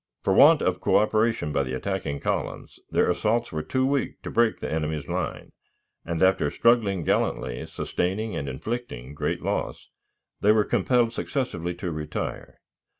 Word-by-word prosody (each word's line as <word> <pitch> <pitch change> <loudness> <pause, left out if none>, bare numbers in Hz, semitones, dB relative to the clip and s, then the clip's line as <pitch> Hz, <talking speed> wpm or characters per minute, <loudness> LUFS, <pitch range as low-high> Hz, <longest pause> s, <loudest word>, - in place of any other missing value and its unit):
For 95 - +2
want 150 +9 +7
of 90 0 +1
coöperation 110 -6 +2
by 70 - +2
the 65 -1 -3
attacking 80 -2 -3
columns, - - -3
their - - +2
assaults 115 +6 0
were 80 - -2
too 130 +9 0
weak 140 0 -1
to - - -5
break 115 -1 +2
the - - -4
enemy's 75 -2 -2
line; - - -4 0.5
and, 85 +1 -1
after 95 -6 +3
struggling 105 -6 +2
gallantly, 60 -4 -1
sustaining 105 +5 -2
and 70 - -3
inflicting 70 - -5
great - - -2
loss, - - -3 0.5
they 105 - +4
were 110 -1 +4
compelled 120 -2 +2
successively 90 - -3
to 90 0 -4
retire. 75 -1 -5
95 Hz, 150 wpm, -25 LUFS, 75-115 Hz, 0.5 s, want